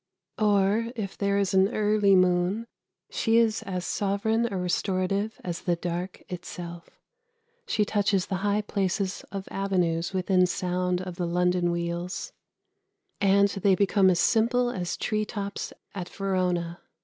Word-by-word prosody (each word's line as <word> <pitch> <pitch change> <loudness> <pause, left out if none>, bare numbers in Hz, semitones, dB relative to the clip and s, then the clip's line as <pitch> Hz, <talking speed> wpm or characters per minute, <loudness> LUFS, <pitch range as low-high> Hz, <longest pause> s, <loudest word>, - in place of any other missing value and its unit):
Or 210 +2 +2
if 205 -4 -4
there 200 0 0
is 200 -1 +1
an 190 0 +5
early 210 -2 +4
moon, 185 +4 +2 0.5
she 225 0 +2
is 225 -2 +3
as 180 -2 -4
sovereign 220 +3 0
a 195 - -2
restorative 190 +3 -1
as 175 -2 -4
the 175 - +1
dark 175 +2 -4
itself. 175 -1 -7 0.8
She 210 - +1
touches 200 -3 +1
the 190 - -2
high 205 +2 +1
places 195 -1 -1
of 195 -1 -5
avenues 180 -4 0
within 185 -1 +2
sound 180 0 -1
of 180 -1 -7
the 175 - -1
London 180 0 +1
wheels, 170 +1 -3 0.9
and 200 0 +4
they 195 -1 +2
become 195 0 +4
as 175 -2 +2
simple 245 +4 +2
as 175 -5 -3
tree 215 -2 -1
tops 200 -2 -5 0.2
at 185 -3 -5
Verona. 180 -3 -1
190 Hz, 140 wpm, -27 LUFS, 180-205 Hz, 0.9 s, an